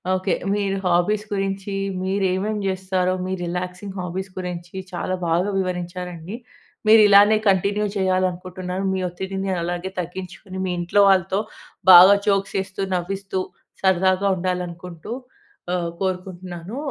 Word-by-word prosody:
Okay. 185 Hz, +1 st, 0 dB, 0.2 s
మీరు 200 Hz, -1 st, 0 dB
hobbies 190 Hz, +5 st, +2 dB
గురించి, 195 Hz, 0 st, -2 dB, 0.3 s
మీరు 195 Hz, +1 st, 0 dB
ఏమేం 210 Hz, +3 st, -1 dB
చేస్తారో, 185 Hz, -1 st, 0 dB
మీ 185 Hz, -, -2 dB
రిలాక్సింగ్ 180 Hz, +3 st, -5 dB
హాబీస్ 185 Hz, +2 st, -4 dB
గురించి 175 Hz, -1 st, -6 dB, 0.2 s
చాలా 185 Hz, +1 st, -2 dB
బాగా 175 Hz, +5 st, +1 dB
వివరించారండి. 180 Hz, 0 st, -4 dB, 0.5 s
మీరు 220 Hz, 0 st, +8 dB
ఇలానే 205 Hz, +2 st, +7 dB
కంటిన్యూ 200 Hz, +2 st, +2 dB
చేయాలనుకుంటున్నాను. 185 Hz, 0 st, -1 dB
మీ 190 Hz, -, -1 dB
ఒత్తిడిని 190 Hz, +2 st, -4 dB
అలాగే 175 Hz, +2 st, -3 dB
తగ్గించుకొని, 185 Hz, +2 st, -7 dB
మీ 185 Hz, -, -1 dB
ఇంట్లో 175 Hz, +4 st, +2 dB
వాళ్ళతో 190 Hz, 0 st, +3 dB, 0.5 s
బాగా 185 Hz, +3 st, +10 dB
జోక్స్ 195 Hz, -1 st, +1 dB
ఏస్తూ, 190 Hz, 0 st, -8 dB
నవ్విస్తూ 190 Hz, +2 st, -3 dB, 0.4 s
సరదాగా 190 Hz, +1 st, +3 dB
ఉండాలనుకుంటూ 180 Hz, 0 st, -4 dB, 0.6 s
ఆహ్, 170 Hz, -1 st, -1 dB
కోరుకుంటున్నాను. 185 Hz, +1 st, -4 dB
185 Hz, 115 wpm, -22 LUFS, 180-195 Hz, 0.6 s, బాగా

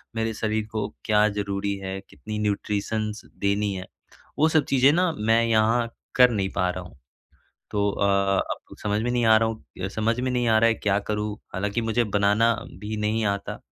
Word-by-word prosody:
मेरे 110 Hz, 0 st, -1 dB
शरीर 110 Hz, 0 st, -1 dB
को 105 Hz, -2 st, -2 dB, 0.2 s
क्या 105 Hz, 0 st, +4 dB
ज़रूरी 100 Hz, 0 st, -2 dB
है 95 Hz, 0 st, -4 dB
कितनी 105 Hz, 0 st, -6 dB
न्यूट्रिशन्स 105 Hz, +1 st, -2 dB, 0.2 s
देनी 100 Hz, 0 st, +1 dB
है 95 Hz, 0 st, -5 dB, 0.5 s
वो 155 Hz, -, +5 dB
सब 155 Hz, -3 st, +3 dB
चीज़ें 135 Hz, +1 st, +5 dB
ना 180 Hz, 0 st, +2 dB
मैं 115 Hz, +2 st, +3 dB
यहाँ 115 Hz, +1 st, +2 dB, 0.3 s
कर 125 Hz, -1 st, +7 dB
नहीं 95 Hz, -3 st, -1 dB
पा 90 Hz, -1 st, +1 dB
रहा 90 Hz, 0 st, -4 dB
हूँ। 90 Hz, -, -14 dB, 0.8 s
तो 100 Hz, -1 st, +1 dB
अ, 100 Hz, -, -1 dB, 0.5 s
अब -, -, -7 dB
समझ 105 Hz, 0 st, 0 dB
में 120 Hz, -, -1 dB
नहीं 120 Hz, -1 st, +1 dB
आ 110 Hz, 0 st, +7 dB
रहा 115 Hz, 0 st, +1 dB
हूँ 110 Hz, -4 st, -6 dB
समझ 110 Hz, +4 st, -1 dB
में 130 Hz, 0 st, -1 dB
नहीं 125 Hz, -1 st, 0 dB
आ 110 Hz, 0 st, +5 dB
रहा 115 Hz, +1 st, +5 dB
है 115 Hz, -, +3 dB
क्या 100 Hz, -2 st, +1 dB
करूँ 105 Hz, 0 st, -1 dB, 0.2 s
हालाँकि 105 Hz, +4 st, -1 dB
मुझे 115 Hz, +1 st, +1 dB
बनाना 105 Hz, +2 st, +3 dB, 0.3 s
भी 105 Hz, +1 st, -4 dB
नहीं 110 Hz, +1 st, 0 dB
आता। 100 Hz, 0 st, -3 dB
110 Hz, 190 wpm, -25 LUFS, 100-115 Hz, 0.8 s, कर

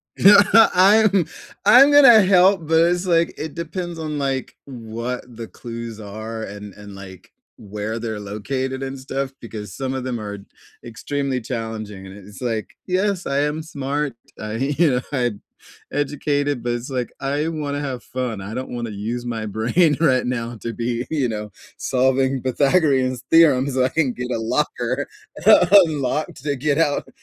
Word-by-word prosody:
Yeah, 200 Hz, +2 st, +7 dB, 0.4 s
I'm 200 Hz, -1 st, +4 dB, 0.4 s
I'm 260 Hz, +7 st, +8 dB
gonna 270 Hz, -7 st, +8 dB
help, 185 Hz, -3 st, +4 dB
but 160 Hz, 0 st, +3 dB
it's, 175 Hz, +1 st, -1 dB
like, 170 Hz, -2 st, +2 dB
it 155 Hz, -2 st, -5 dB
depends 170 Hz, +1 st, -5 dB
on, 155 Hz, -2 st, -4 dB
like, 135 Hz, -2 st, -2 dB
what 120 Hz, -1 st, -6 dB
the 115 Hz, -1 st, -7 dB
clues 115 Hz, -1 st, -8 dB
are 110 Hz, +2 st, -7 dB
and 105 Hz, -1 st, -8 dB
and, 105 Hz, -1 st, -12 dB
like, 95 Hz, -2 st, -12 dB, 0.3 s
where 105 Hz, +2 st, -5 dB
they're 110 Hz, -2 st, -4 dB
located 130 Hz, +7 st, -4 dB
and 135 Hz, 0 st, -5 dB
stuff, 135 Hz, 0 st, -4 dB
because 105 Hz, -4 st, -8 dB
some 135 Hz, -1 st, -3 dB
of 130 Hz, -1 st, -4 dB
them 125 Hz, -2 st, -3 dB
are 105 Hz, -1 st, -6 dB, 0.5 s
extremely 135 Hz, +2 st, -3 dB
challenging, 110 Hz, -4 st, -6 dB
and 95 Hz, -, -11 dB
it 100 Hz, -, -14 dB
it's 105 Hz, +4 st, -13 dB
like, 115 Hz, -3 st, -3 dB
"Yes, 190 Hz, 0 st, 0 dB
I 140 Hz, 0 st, 0 dB
am 150 Hz, +2 st, -1 dB
smart. 145 Hz, -3 st, -3 dB, 0.2 s
I 105 Hz, 0 st, -5 dB
you 145 Hz, +6 st, +1 dB
know, 125 Hz, 0 st, 0 dB
I'm 120 Hz, -7 st, -1 dB, 0.5 s
educated," 145 Hz, -1 st, -1 dB
but 120 Hz, 0 st, -1 dB
it's 120 Hz, +3 st, -5 dB
like, 125 Hz, -3 st, -2 dB
"I 145 Hz, +3 st, -1 dB
wanna 145 Hz, -3 st, -3 dB
have 130 Hz, -4 st, -5 dB
fun. 125 Hz, -5 st, -4 dB
I 100 Hz, +3 st, -7 dB
don't 130 Hz, +2 st, -5 dB
wanna 120 Hz, -2 st, -4 dB
use 115 Hz, +4 st, -4 dB
my 115 Hz, -2 st, -4 dB
brain 125 Hz, -, +2 dB
right 130 Hz, -6 st, +2 dB
now 120 Hz, -1 st, -3 dB
to 115 Hz, -, -4 dB
be, 120 Hz, +1 st, -3 dB
you 145 Hz, -5 st, 0 dB
know, 105 Hz, -1 st, -5 dB, 0.3 s
solving 130 Hz, +1 st, +1 dB
Pythagorean's 135 Hz, -2 st, +1 dB
Theorem 150 Hz, -5 st, +5 dB
so 130 Hz, -1 st, +1 dB
I -, -, +1 dB
can 145 Hz, -5 st, 0 dB
get 125 Hz, +1 st, -5 dB
a 115 Hz, -, 0 dB
locker 125 Hz, +2 st, -1 dB, 0.8 s
unlocked 150 Hz, -3 st, -3 dB
to 145 Hz, -2 st, -1 dB
get 145 Hz, +2 st, 0 dB
out 155 Hz, -3 st, +1 dB
130 Hz, 170 wpm, -21 LUFS, 115-150 Hz, 0.8 s, I'm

